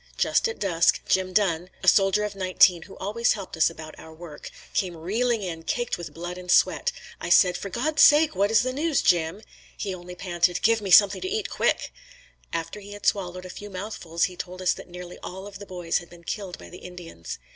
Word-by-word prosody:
Just - - +2
at 460 - -5
dusk, 170 -4 +2
Jim 185 0 +1
Dunn, 180 -3 +1
a - - -4
soldier 195 +1 +5
of 210 -1 -3
nineteen 185 -2 +4
who 190 - -12
always 225 +5 +1
helped 195 -5 -7
us 160 - +4
about 155 -1 -10
our 160 - -12
work, 160 -2 -10 0.2
came 180 -3 -1
reeling 220 +6 0
in, 165 -3 -5
caked 240 +8 -2
with 175 - -8
blood 175 +2 -6
and 180 0 -11
sweat. 485 - +3 0.3
I - - -5
said, 180 -2 +5
"For 200 - -5
God's 300 - 0
sake, 300 +1 +7
what 200 +2 +2
is 220 +1 +4
the 255 0 -2
news, 300 +1 0
Jim?" 175 +3 +1 0.3
He 195 -2 -3
only 180 0 -9
panted, 175 -1 0
"Give 225 0 +3
me 200 - -4
something 200 +2 +6
to 375 - -3
eat 430 +1 -2
quick." - - 0 0.6
After 165 +5 -4
he 205 0 -10
had 205 - -10
swallowed 185 -2 0
a - - -8
few 205 +2 -9
mouthfuls, 185 -4 -4
he 180 - 0
told 180 +1 -7
us 185 -1 +2
that - - -11
nearly 180 0 -9
all 190 +2 -7
of 205 -1 -10
the 205 - -10
boys 175 -3 -1
had 175 - -14
been 170 -1 -15
killed 190 0 -5
by - - -12
the 180 - -10
Indians. 175 - -9
185 Hz, 220 wpm, -25 LUFS, 175-205 Hz, 0.6 s, sake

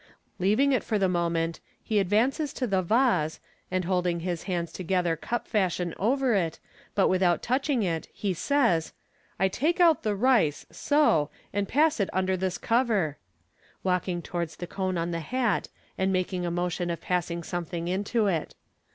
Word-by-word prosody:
Leaving 215 +10 +3
it 255 - +2
for 215 - 0
the 195 -2 +2
moment, 170 -2 0 0.2
he 215 -2 +1
advances 240 - +1
to 255 - -2
the 195 -5 +1
vase, 215 - +2 0.3
and 185 -1 -1
holding 180 -2 0
his 175 -1 -3
hands 170 -2 -1
together 180 -2 0
cup 240 +9 -4
fashion 180 -5 0
over 255 +4 +2
it, 170 -5 0 0.4
but 195 - +4
without 185 -2 +2
touching 260 -1 +1
it, 165 -4 -2
he 200 -3 -2
says, 230 - +1 0.5
"I 190 - +4
take 310 - 0
out 335 -3 +5
the 210 -1 0
rice, 215 - +2
so, 285 - +2 0.2
and 200 0 0
pass 300 +3 +3
it 200 - +1
under 190 0 +1
this 185 0 -2
cover 225 - +1 0.3
" - - -34
(walking 180 -1 0
towards 170 -2 -4
the 175 - -6
cone 185 0 -2
on 170 +1 -1
the 170 - -2
hat, 235 +5 0 0.3
and 190 0 +2
making 185 -1 -1
a - - 0
motion 175 0 -1
of 170 - -2
passing 170 -1 -2
something 170 0 -4
into 205 +5 0
it). 170 -6 -1
185 Hz, 170 wpm, -27 LUFS, 175-225 Hz, 0.5 s, out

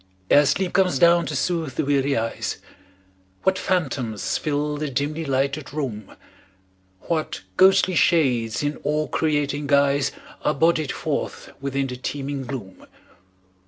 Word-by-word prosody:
Ere 145 0 +6
sleep 190 +3 0
comes 180 -6 +3
down 170 +3 +5
to 150 - -3
soothe 160 -2 -1
the - - 0
weary 140 -1 +1
eyes, 115 +1 -2 0.9
What 190 -1 +2
phantoms 135 - -1
fill 150 0 -1
the 150 0 -3
dimly 145 +4 -2
lighted 140 +1 -1
room; 125 -9 -5 0.9
What 160 - -2
ghostly 190 0 +5
shades 130 -10 +2
in 145 +1 -2
awe 150 +1 0
creating 145 -2 -1
guise 140 -1 +3 0.3
Are 150 - +1
bodied 160 -1 +2
forth - - -4
within 140 0 -1
the 125 -1 -5
teeming 140 +1 -4
gloom. 115 -8 -8
145 Hz, 130 wpm, -23 LUFS, 135-160 Hz, 0.9 s, Ere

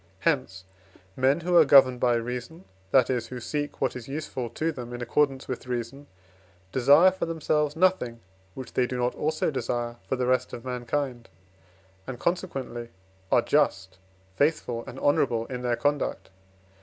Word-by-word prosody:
Hence, 95 0 0 0.5
men 135 +5 +2
who 175 +1 0
are - - +9
governed 130 -3 +6
by 120 -1 +3
reason 125 +8 -5 0.2
that 130 +1 +4
is, 120 -3 -1
who 125 +1 -7
seek 145 +4 -4
what - - 0
is 125 -2 -8
useful 135 -4 -4
to 160 +8 -2
them 120 -5 -8
in 120 - -6
accordance 135 +1 +1
with 130 0 -5
reason, 125 +3 -4 0.6
desire 145 - +6
for 185 - -4
themselves 150 -2 0
nothing, 165 -10 +1 0.4
which 130 - -8
they 125 - +2
do 125 - -4
not 125 0 0
also 155 +1 -1
desire 120 -2 -3
for - - +1
the 125 -1 -1
rest 125 0 +1
of 120 - -7
mankind, 125 0 -3 0.8
and, 130 - -5
consequently, 135 -10 -3 0.4
are 120 - +4
just, 95 -10 +1 0.4
faithful, 140 -5 0
and 130 - -8
honourable 125 -5 +1
in 125 0 -6
their 120 -1 0
conduct. 145 -5 -1
130 Hz, 160 wpm, -26 LUFS, 120-145 Hz, 0.8 s, are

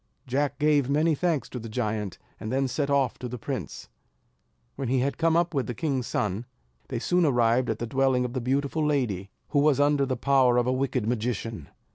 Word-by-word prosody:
Jack 140 +2 -1
gave 145 -3 +2
many 155 +3 +3
thanks 160 -1 0
to 125 - -6
the 115 0 -7
giant, 105 -4 -2 0.2
and 110 - -5
then 135 +1 +1
set 140 +3 -1
off 140 -3 +1
to 125 - -4
the 125 +1 -5
prince. 110 - -5 0.9
When 135 - -3
he 130 +1 +2
had 140 +2 -1
come 165 0 +3
up 175 0 +1
with 135 -3 -1
the 120 - -4
king's 135 -4 -1
son, 105 +3 -2 0.4
they - - -3
soon 180 0 +1
arrived 120 -3 +3
at 110 - -1
the 120 - -3
dwelling 130 0 +1
of 125 - -5
the 130 - -2
beautiful 140 +5 0
lady, 120 -11 0 0.2
who 145 - +2
was 145 -1 +3
under 145 -1 +3
the 130 -1 -1
power 130 -2 +3
of 120 - +3
a 125 - +1
wicked 130 -3 -1
magician. 115 - -3
130 Hz, 210 wpm, -26 LUFS, 120-145 Hz, 0.9 s, many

